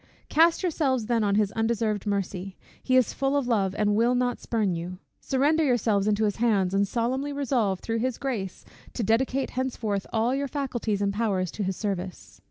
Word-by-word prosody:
Cast 330 +4 +4
yourselves 275 -9 0
then 230 -1 +1
on 200 -1 +2
his 205 -1 +2
undeserved 225 -2 -1
mercy; 195 -1 -3 0.2
he 255 - +1
is 255 - +3
full 275 +1 0
of 275 -3 -1
love, 200 -5 +1
and 210 -1 +2
will 235 +3 +3
not 245 0 0
spurn 215 -5 0
you: 175 +2 -5 0.2
surrender 290 +4 +2
yourselves 225 -7 +2
into 215 +1 +2
his 205 -2 0
hands, 205 -5 +2
and 200 +1 +2
solemnly 255 +6 -1
resolve, 245 -9 0
through 225 0 -2
his 255 +1 -1
Grace, 220 -9 -4 0.3
to 235 - -2
dedicate 255 +5 +1
henceforth 235 -6 -2
all 230 +3 +1
your 280 +1 -1
faculties 240 -7 -2
and 200 0 0
powers 195 -5 0
to - - -6
his 190 -2 -2
service. 180 - -5
225 Hz, 185 wpm, -26 LUFS, 200-255 Hz, 0.3 s, Cast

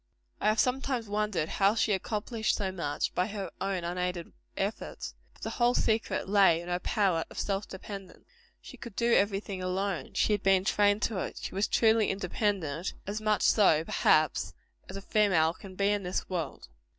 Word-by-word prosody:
I - - 0
have 215 +1 +3
sometimes 255 -2 0
wondered 205 -6 -1
how 200 +5 +2
she 220 -1 +2
accomplished 215 +3 -1
so 195 -2 -2
much, 165 -6 -2
by 180 - +1
her 200 -3 -5
own 195 -2 -1
unaided 180 0 -3 0.2
efforts. 200 +3 -4 0.2
But - - -15
the - - -2
whole 245 0 +2
secret 220 -3 0
lay 195 -4 +5
in 175 +1 -8
her 175 0 0
power 180 -4 +1
of - - -8
self 200 0 -2
dependence. 195 0 -9 0.3
She - - -12
could 235 -5 -9
do 235 0 +2
every 200 0 +3
thing 195 -2 -6
alone. 185 +1 -2
She 215 - +2
had 205 - 0
been 195 -1 +3
trained 205 +1 +3
to 210 -5 0
it. - - -4
She - - -5
was 195 +2 +1
truly 225 -1 +3
independent; 185 -4 -2
as 210 +2 -4
much 215 -1 +1
so, 165 -7 +4
perhaps, 155 -3 +2 0.3
as - - -7
a 195 - -8
female 185 -7 +3
can 190 0 -12
be 200 +1 +2
in 205 -1 0
this 180 -1 -3
world. 170 -6 -4
195 Hz, 185 wpm, -29 LUFS, 180-210 Hz, 0.3 s, lay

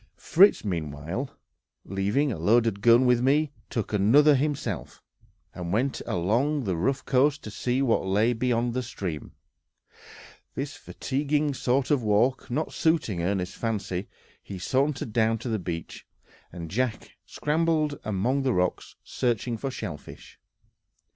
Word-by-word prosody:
Fritz 195 - +4
meanwhile, 85 - -3 0.6
leaving 100 +10 0
a 95 - -4
loaded 110 +2 +2
gun 120 +3 +6
with 125 -1 +4
me, 145 +3 +2 0.2
took 115 -2 -3
another 130 +10 +5
himself, 145 +1 -2 0.5
and 85 -1 -5
went 125 +7 0
along 120 - +1
the 95 -5 -1
rough 130 +11 -1
coast 140 +3 +2
to 105 - -7
see 125 +6 -1
what 120 -4 +2
lay 105 +5 +2
beyond 120 0 0
the 130 - -1
stream; 95 -10 -6 1.2
this - - -4
fatiguing 145 +2 -1
sort 130 +1 0
of 145 -4 +3
walk 115 +5 +1
not 150 +6 -2
suiting 155 - +1
Ernest's 90 0 -1
fancy, 100 -4 -3 0.3
he 100 - -8
sauntered 130 - -1
down 115 0 +2
to 120 +2 -6
the 110 -2 -1
beach, 85 -2 -6 0.4
and 85 -2 -8
Jack 125 +1 -2 0.2
scrambled 155 -1 0
among 110 +7 0
the 130 -2 +1
rocks, 90 0 -1
searching 120 -1 -1
for 135 +5 -4
shellfish. 105 - -8
120 Hz, 135 wpm, -26 LUFS, 100-135 Hz, 1.2 s, gun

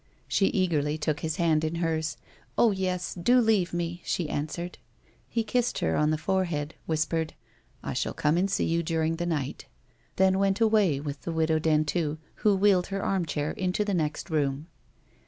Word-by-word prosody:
She 195 - +2
eagerly 155 -5 +1
took 150 -1 -1
his 160 -1 -2
hand 160 -2 +2
in 160 +1 -1
hers; 160 -2 -1 0.2
" - - -32
Oh, 235 - +5
yes; 185 -2 -2
do 240 +9 +3
leave 215 -6 +2
me," 175 0 -3
she 165 -4 -1
answered. 170 +4 -4 0.5
He 230 - -1
kissed 245 +2 0
her 80 - 0
on 150 - +2
the 155 - +1
forehead, 160 -3 -1
whispered, 160 0 -1 0.2
" - - -35
I - - -3
shall - - -2
come 150 +1 +2
and 185 +3 +1
see 195 - +1
you 165 +1 +1
during 160 0 0
the 175 0 -2
night," 145 -6 -3 0.5
then 190 0 +3
went 195 0 +2
away 210 -10 +3
with 145 -1 -5
the 170 - -4
Widow 160 -1 +1
Dentu, 155 0 +1 0.2
who 210 -2 +3
wheeled 190 -2 +3
her 195 0 -3
armchair 160 -6 -1
into 190 +2 -1
the 205 - -1
next 155 0 -2
room. 145 -1 0
170 Hz, 185 wpm, -27 LUFS, 155-190 Hz, 0.5 s, Oh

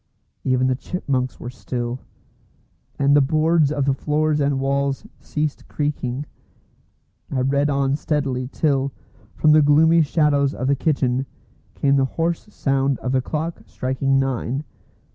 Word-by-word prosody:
Even 130 -1 +2
the 130 - +2
chipmunks 130 -4 -3
were 120 - -6
still; 125 0 -4 1.0
and 140 +1 +3
the 145 - +6
boards 155 +1 +2
of 145 -3 0
the 135 - +2
floors 150 +2 0
and 140 -1 +1
walls 140 0 -1
ceased 150 -1 -3
creaking. 145 -2 -2 1.0
I 130 - -1
read 140 +3 +1
on 140 -1 +1
steadily 135 -4 -1
till, 140 -1 0 0.4
from 155 - +4
the 155 0 +6
gloomy 160 +3 +5
shadows 145 -2 +2
of 130 - -3
the 140 +1 +3
kitchen, 135 -3 0 0.5
came 140 0 +2
the 135 - +3
hoarse 170 +5 -1
sound 135 -3 0
of 125 - -3
the 130 -1 +2
clock 160 +5 -4
striking 130 +1 0
nine. 135 +1 -1
140 Hz, 145 wpm, -22 LUFS, 130-150 Hz, 1.0 s, the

